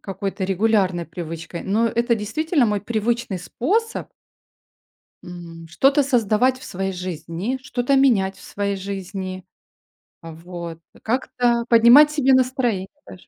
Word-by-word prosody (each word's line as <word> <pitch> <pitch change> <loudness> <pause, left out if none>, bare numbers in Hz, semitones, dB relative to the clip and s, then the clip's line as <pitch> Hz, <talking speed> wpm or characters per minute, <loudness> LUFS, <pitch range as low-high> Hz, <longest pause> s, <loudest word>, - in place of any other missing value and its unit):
какой-то 195 0 -4
регулярной 190 -3 +1
привычкой. 165 0 -7
Но 220 +4 +1
это 235 +1 +1
действительно 270 - 0
мой 210 -2 0
привычный 230 -2 -2
способ 420 - -2 1.1
м, 170 -2 -10
что-то 275 - +3
создавать 250 -1 +2
в - - -12
своей 190 +1 -3
жизни, 180 - -4
что-то 250 +2 0
менять 205 -8 +3
в - - -16
своей 200 0 -3
жизни, 190 -1 -6 0.8
вот, 165 0 -8 0.2
как-то 240 0 0
поднимать 240 +6 +7
себе 270 -3 +3
настроение 250 -7 +1 0.2
даже. 180 - -13
210 Hz, 120 wpm, -22 LUFS, 185-245 Hz, 1.1 s, поднимать